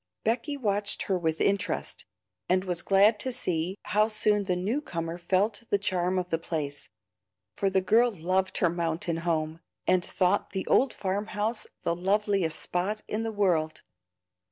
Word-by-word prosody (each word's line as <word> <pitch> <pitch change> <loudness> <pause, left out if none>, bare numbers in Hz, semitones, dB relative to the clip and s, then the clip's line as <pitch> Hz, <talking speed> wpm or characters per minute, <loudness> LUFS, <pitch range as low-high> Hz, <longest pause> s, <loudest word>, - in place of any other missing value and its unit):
Becky 240 +6 0
watched 205 -4 0
her 190 -2 0
with 160 -2 -1
interest, 200 +1 0 0.4
and 185 +1 +3
was 180 -2 -2
glad 205 +3 +4
to 260 - -2
see 180 -6 -2
how 210 +1 +2
soon 210 -2 +2
the 185 -2 +1
new 210 +11 -1
comer 170 - -4
felt 195 +5 +1
the 200 - +3
charm 185 -2 0
of 180 -1 -2
the 165 - +1
place, 150 -4 -3 0.7
for 195 - +1
the 190 0 +2
girl 225 +6 +4
loved 185 -1 -1
her 175 - +3
mountain 170 -1 -1
home, 160 -1 -1 0.3
and 185 -1 +3
thought 185 +1 0
the 190 - -2
old 265 -2 +3
farm 200 +2 -2
house 215 +1 -1 0.2
the 170 - +1
loveliest 195 -3 +1
spot 200 +5 -1
in 215 - -2
the 225 0 -2
world. 175 -7 0
190 Hz, 165 wpm, -28 LUFS, 175-210 Hz, 0.7 s, glad